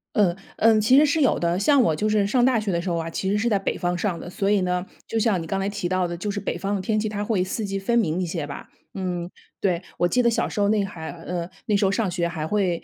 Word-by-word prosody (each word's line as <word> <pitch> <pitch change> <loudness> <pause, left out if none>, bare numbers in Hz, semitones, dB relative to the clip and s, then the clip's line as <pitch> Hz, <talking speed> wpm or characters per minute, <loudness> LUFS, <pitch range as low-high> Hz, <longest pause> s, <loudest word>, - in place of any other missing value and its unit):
嗯， 185 -5 +3 0.2
嗯， 220 -1 +5
其 255 +5 +5
实 300 - +7
是 300 +2 +1
有 265 - +3
的。 170 +1 +1
像 270 +7 +4
我 160 -9 +2
就 215 +4 0
是 210 -2 +2
上 245 +3 +2
大 250 -3 +4
学 210 -2 -3
的 170 0 0
时 180 - -3
候 170 - 0
啊， 165 0 -3
其 190 +3 -2
实 205 - +2
是 225 - 0
在 210 -4 +3
北 195 - -2
方 175 0 -1
上 175 -2 -1
的， 175 - -8
所 195 +2 -1
以 205 - +4
呢， 180 0 -1 0.2
就 225 - -2
像 215 -6 +2
你 165 - -7
刚 195 - -1
才 195 +1 -1
提 200 -3 -3
到 185 0 +1
的， 175 0 -4
就 205 +4 -4
是 205 - -3
北 175 - -3
方 195 +3 -2
的 195 - -2
天 215 +2 0
气， 215 - -1
它 210 -1 -3
会 205 -4 0
四 210 +4 -3
季 195 -1 -2
分 235 +5 +1
明 180 -6 +1
一 - - 0
些 165 -3 -3
吧， 140 - -8 0.3
嗯， 180 -2 -3 0.3
对。 180 -3 +1 0.2
我 175 - +2
记 250 +7 +2
得 235 - +4
小 230 - 0
时 - - -4
候 200 - +3
那 210 -1 +2
还 160 -4 -6
呃， 175 +1 -5 0.2
那 210 -2 +3
时 200 - +2
候 190 - +3
上 205 -3 0
学 170 -1 0
还 160 -2 -4
会 185 -2 0
195 Hz, 330 characters per minute, -24 LUFS, 175-215 Hz, 0.3 s, 实